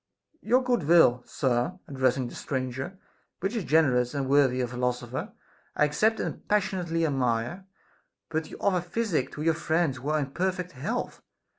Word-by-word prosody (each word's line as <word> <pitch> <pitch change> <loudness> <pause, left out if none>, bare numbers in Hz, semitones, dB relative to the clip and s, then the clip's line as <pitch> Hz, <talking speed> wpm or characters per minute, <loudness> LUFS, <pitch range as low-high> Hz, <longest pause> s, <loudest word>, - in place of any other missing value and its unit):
Your 250 +4 +3
good 245 -9 +1
will, 160 -8 +6
sir 125 +6 0
(addressing 130 -3 +1
the - - -10
stranger), 130 +6 -4 0.4
which 195 +6 -2
is 220 - -1
generous 135 -6 +3
and 140 -2 -1
worthy 135 -2 +4
a 125 - 0
philosopher, 125 0 -3 0.4
I 150 - +4
accept 215 +10 +2
and - - -4
passionately 180 -5 +1
admire; 135 +5 -1 0.6
but 160 -1 -2
you - - -9
offer 185 -3 +2
physic 175 - -1
to 150 - -5
your 165 0 +3
friends 160 -3 0
who 135 +3 -5
are 155 - +2
in 140 -3 -2
perfect 185 +2 -2
health! 135 -4 -4
150 Hz, 160 wpm, -27 LUFS, 130-180 Hz, 0.6 s, will